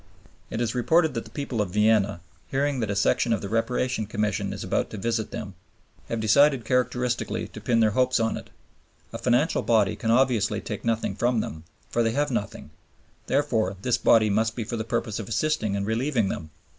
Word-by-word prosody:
It 110 - -3
is 120 - 0
reported 160 +6 +2
that 115 - -4
the - - -12
people 135 -6 -3
of 100 - -2
Vienna, 105 -2 +2 0.3
hearing 140 0 0
that 110 -3 -1
a 100 - -1
section 115 +4 +2
of 110 - +1
the 100 - -5
Reparation 115 0 0
Commission 105 -1 -1
is - - -5
about - - -1
to 110 - -7
visit 115 +1 -1
them, 100 -2 -6 0.6
have 115 - -2
decided 130 +3 +4
characteristically 125 0 0
to - - -10
pin 115 -1 +2
their 110 -1 +4
hopes 130 +3 +2
on 115 0 0
it. - - -9 0.6
A - - -5
financial 125 +7 +2
body 110 -4 +2
can 110 - -3
obviously 115 -3 +2
take 105 - -6
nothing 115 -1 0
from 120 -1 +1
them, 80 -5 -5 0.3
for 120 - +1
they 115 -1 +1
have 145 +2 0
nothing; 105 -4 -4 0.6
therefore 110 -9 +1
this 125 -1 +1
body 110 -2 +4
must 110 +2 +1
be 120 - -3
for 115 +2 -4
the 110 - -2
purpose 115 -2 -2
of 110 - -6
assisting 110 -4 0
and 100 0 -1
relieving 115 -1 0
them. 80 - -5
115 Hz, 200 wpm, -25 LUFS, 105-125 Hz, 0.6 s, decided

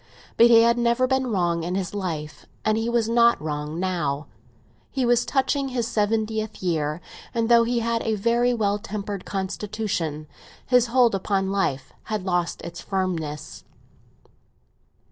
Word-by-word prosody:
But 235 - +7
he 230 -1 +7
had 235 +1 +3
never 235 +2 +2
been 265 0 +1
wrong 175 -6 0
in 175 +2 -3
his 190 -2 -3
life, 165 -7 -5 0.2
and 215 - +3
he 225 +1 -1
was 235 -2 +1
not 235 0 +4
wrong 150 +1 -4
now. 170 -6 -1 0.6
He 265 -2 -1
was 240 0 +2
touching 275 0 +1
his 250 -3 -2
seventieth 220 -1 -1
year, 155 -2 -1 0.3
and 230 0 0
though 235 -1 +6
he 240 0 0
had 230 0 0
a 220 -1 0
very 235 +4 +2
well 205 -3 0
tempered 205 -2 -5
constitution, 190 -5 -3 0.4
his 250 -1 +4
hold 240 -1 +4
upon 195 0 0
life 140 -9 -1
had 215 -3 -3
lost 175 -2 -1
its 170 +1 -7
firmness. 165 -6 -3
210 Hz, 150 wpm, -24 LUFS, 175-235 Hz, 0.6 s, But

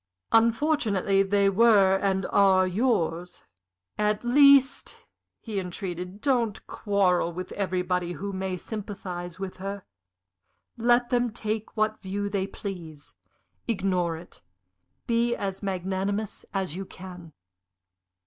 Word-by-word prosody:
"Unfortunately 225 - +3
they 200 0 +2
were 195 -2 +5
and 190 -1 0
are 190 -2 +5
yours. 180 -4 -1 0.6
At 210 +1 +1
least," 275 +1 +5 0.4
he 215 -4 -4
entreated, 180 +1 -6
"don't 240 -7 0
quarrel 185 -4 +1
with 180 +2 -6
everybody 180 -2 -1
who 200 +2 -5
may 190 -1 -3
sympathize 180 -4 -6
with 195 -1 -5
her. 195 +1 -5 0.9
Let 240 +2 +2
them 245 -1 +2
take 220 -1 -4
what 215 0 0
view 200 +1 -3
they 195 -1 -1
please. 170 -7 -8 0.5
Ignore 185 -6 0
it 170 - -13 0.6
be 235 0 +1
as 195 -3 -4
magnanimous 195 +2 -3
as 190 -5 -2
you 195 - -4
can." 180 -4 -11
195 Hz, 110 wpm, -26 LUFS, 185-220 Hz, 0.9 s, were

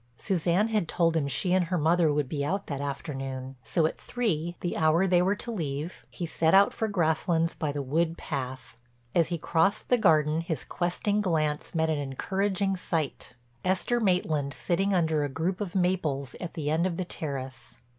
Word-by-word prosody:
Suzanne 185 +3 +1
had 215 -6 +1
told 165 -1 +2
him 150 -3 +1
she 180 +6 +1
and 185 -1 +3
her 180 +2 -1
mother 165 0 +3
would 145 -2 0
be 140 0 -2
out 195 +7 -1
that 140 -2 -4
afternoon, 135 -2 -5
so 165 -3 +1
at 155 - -2
three—the 175 -7 -2
hour 160 +3 +3
they 180 -2 +4
were 190 +3 +2
to 235 - -5
leave—he 165 -1 -4
set 160 +1 +2
out 200 +1 +6
for 220 - -1
Grasslands 165 -3 +1
by 150 -2 -2
the 145 0 -3
wood 165 +5 0
path. 130 -4 -5 0.4
As 170 -2 +3
he 170 - -2
crossed 165 +4 +1
the 245 - +4
garden 155 -4 +4
his 165 -2 -3
questing 195 +4 -1
glance 155 -5 -1
met 160 0 +2
an 150 - 0
encouraging 195 +8 -1
sight—Esther 160 - -2
Maitland 160 -9 +1
sitting 195 +3 0
under 160 -5 +2
a 145 - -1
group 170 +8 -2
of 195 -2 -4
maples 160 -8 0
at 175 - -6
the 150 -2 -1
end 165 +3 +2
of 170 -2 -3
the 185 - -2
terrace. 135 -6 -6
165 Hz, 180 wpm, -28 LUFS, 150-185 Hz, 0.4 s, out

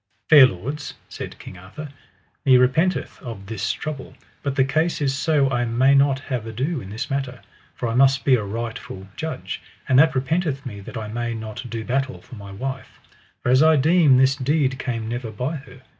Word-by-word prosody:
Fair 145 -4 +10
lords, 135 - -6
said - - -7
King 90 - -11
Arthur, 145 +12 -9 0.5
me 130 -2 +6
repenteth 160 +9 +1
of 115 -6 -8
this 110 +2 -2
trouble, 150 -4 -6 0.3
but 140 -1 -2
the 130 - +4
case 155 +5 0
is 140 -2 +1
so 140 0 +2
I 120 -2 +1
may 120 +4 +3
not 140 -1 +4
have 125 -5 -4
ado 130 +7 -2
in 95 - -9
this 110 +6 -5
matter, 135 -3 -3 0.3
for 120 - -3
I 115 - -2
must 135 +2 +4
be 135 - +5
a 120 -4 +3
rightful 105 -2 -6
judge; 160 0 -5 0.3
and 130 0 +5
that 160 -1 +5
repenteth 140 +1 -1
me 105 -5 -6
that 100 - -8
I 110 -1 -5
may 120 +2 -3
not 110 +3 -7
do 115 -1 -5
battle 130 +1 -1
for - - -17
my 100 -3 -9
wife, 130 +6 -6 0.4
for - - 0
as 130 +2 +5
I 160 0 +6
deem 150 -1 +5
this 130 +1 +4
deed 140 -1 0
came 115 -3 -3
never 120 0 -4
by 125 +9 -3
her. 130 -2 -14
130 Hz, 200 wpm, -22 LUFS, 115-140 Hz, 0.5 s, Fair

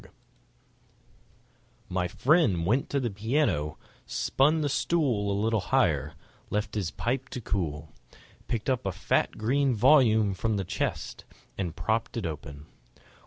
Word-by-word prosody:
Music - - -19 1.7
My 90 -1 0
friend 125 - +2
went 125 +9 +1
to 140 - 0
the 120 -4 -2
piano; 100 - 0 0.3
spun 150 - +2
the 145 - +1
stool 135 -8 +1
A 100 - 0
little 110 +1 +1
higher; 80 - +1 0.3
left 105 0 -2
his 100 -5 -1
pipe 130 +7 -2
to - - -5
cool; 80 -9 -3 0.6
Picked 110 -3 -2
up 130 -6 0
a - - 0
fat - - 0
green 130 +4 +1
volume 110 -4 +5
from 110 +3 -1
the 95 - -2
chest; - - -3 0.3
And 90 -4 -3
propped 115 +3 -1
it 115 - -2
open. 75 -2 -6
110 Hz, 140 wpm, -28 LUFS, 90-130 Hz, 1.7 s, volume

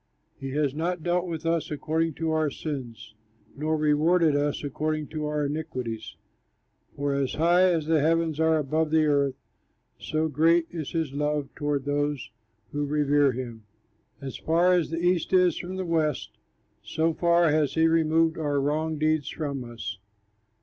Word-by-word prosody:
He 135 - -5
has 145 -2 0
not 170 +2 -2
dealt 175 +1 0
with 165 -1 -5
us 165 -1 0
according 160 +1 -1
to 165 -1 -2
our 155 -1 +1
sins, 120 -7 -6 0.4
Nor 155 +2 -1
rewarded 155 +1 +3
us 145 +1 0
according 155 +2 -2
to 155 -1 -3
our 150 -1 -1
iniquities. 140 -7 -4 0.8
For 140 0 -1
as 140 -2 -1
high 175 +3 +4
as 165 -3 0
the 160 -1 +2
heavens 160 0 +1
are 160 0 +3
above 155 +2 0
the 160 0 +3
earth, 140 -3 +2 0.6
So 155 +1 -1
great 165 +3 +3
is 160 -4 -5
his 160 -5 -1
love 150 -1 -1
toward 145 -2 -2
those 145 -4 -1 0.4
who 145 0 -2
revere 145 -1 +3
him. 120 -3 -7 0.5
As 135 -2 -6
far 170 +3 +3
as 175 -3 +1
the 165 - -3
east 175 +1 +1
is 180 -3 +4
from 185 +1 -6
the 190 0 -3
west, 155 -4 0 0.5
So 160 +1 0
far 170 0 +3
has 150 -2 +1
he 160 0 +4
removed 160 0 +2
our 145 -2 0
wrong 155 +3 -1
deeds 155 -1 +1
from 140 -4 -4
us. 115 -4 -7
155 Hz, 165 wpm, -26 LUFS, 145-165 Hz, 0.8 s, high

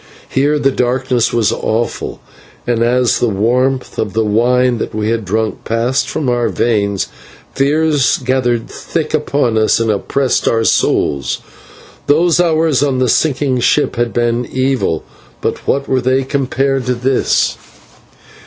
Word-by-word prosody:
Here 145 +3 +1
the 135 -2 +2
darkness 125 -1 0
was 115 -3 +1
awful, 115 +2 -3 0.4
and 120 -2 0
as 125 +1 +2
the 120 - +1
warmth 125 +6 0
of 105 -3 -2
the 110 0 +1
wine 120 +3 +2
that - - -4
we 110 0 -1
had 115 -1 -1
drunk 110 +3 -2
passed 120 +4 0
from 145 - -2
our 120 -1 +1
veins, 100 -4 0 0.5
fears 145 0 +2
gathered 125 -3 0
thick - - -4
upon 120 -6 +1
us 110 - +2
and 115 -1 +1
oppressed 130 +6 0
our 115 -1 +2
souls. 70 -9 +1 0.7
Those 165 +4 +3
hours 160 -5 +2
on 140 -3 +1
the 130 -1 +1
sinking 135 -1 +1
ship 145 +3 +1
had 120 -1 -1
been 120 0 0
evil, 130 -10 -1 0.4
but - - -4
what 140 0 0
were 130 -1 +1
they 130 +2 +1
compared 135 -1 -1
to 125 - +1
this? 130 +2 +1
125 Hz, 145 wpm, -15 LUFS, 115-135 Hz, 0.7 s, Those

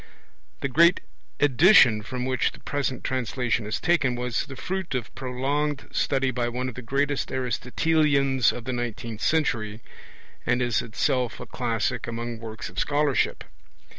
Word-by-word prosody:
The - - 0
great 170 +6 +5 0.4
edition 145 - +6
from 125 +3 -4
which 130 -1 0
the - - -13
present 140 -3 -2
translation 125 -3 -1
is 110 - -2
taken 150 -8 +2
was 125 0 -2
the 135 - -8
fruit 185 +1 -3
of 120 -3 -4
prolonged 135 +3 -2
study 135 -1 +1
by 120 -1 -1
one 125 +2 -3
of 130 - -4
the 125 - -7
greatest 140 +4 -1
Aristotelians 135 +1 +2
of 125 - -7
the 130 - -3
nineteenth 115 -2 -4
century, 115 -10 0 0.6
and 125 +1 +1
is 120 -3 +1
itself 120 +2 -1
a - - -7
classic 120 0 -2
among 120 0 -4
works 110 -1 -7
of - - -6
scholarship. 145 -1 +1
125 Hz, 150 wpm, -25 LUFS, 120-140 Hz, 0.6 s, edition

